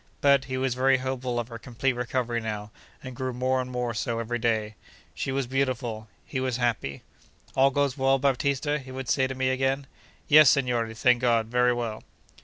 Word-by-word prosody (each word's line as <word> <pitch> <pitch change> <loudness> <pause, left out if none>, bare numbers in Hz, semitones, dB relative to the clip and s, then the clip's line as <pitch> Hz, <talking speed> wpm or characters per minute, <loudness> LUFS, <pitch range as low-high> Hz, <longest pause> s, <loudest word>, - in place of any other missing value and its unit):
But, 140 -1 +4
he 130 0 -3
was 130 -1 0
very 130 +1 +3
hopeful 130 -1 -3
of 120 0 -4
her 115 -1 -8
complete 130 +2 -1
recovery 120 -1 -2
now, 105 -1 -5 0.3
and 130 -1 -8
grew 130 0 -3
more 130 +1 0
and 125 - -6
more 125 -1 -2
so 110 +2 -2
every 120 +1 -2
day. 110 -2 0 0.4
She - - -3
was 135 0 -1
beautiful. 125 -4 -2 0.2
He 130 - -4
was 130 -2 -1
happy. 115 - -2 0.5
'All 135 +1 +5
goes 140 0 0
well, 135 0 +3
Baptista?' 140 +2 0
he 130 -1 -12
would 130 -1 -6
say 130 -1 +2
to 130 - -5
me 130 0 0
again. 135 +1 0 0.4
'Yes, 150 -2 +8
signore, 120 -4 +1
thank 125 +2 +3
God; 115 -3 +2
very 125 +1 +3
well. 120 -3 -3
125 Hz, 195 wpm, -26 LUFS, 120-135 Hz, 0.5 s, Yes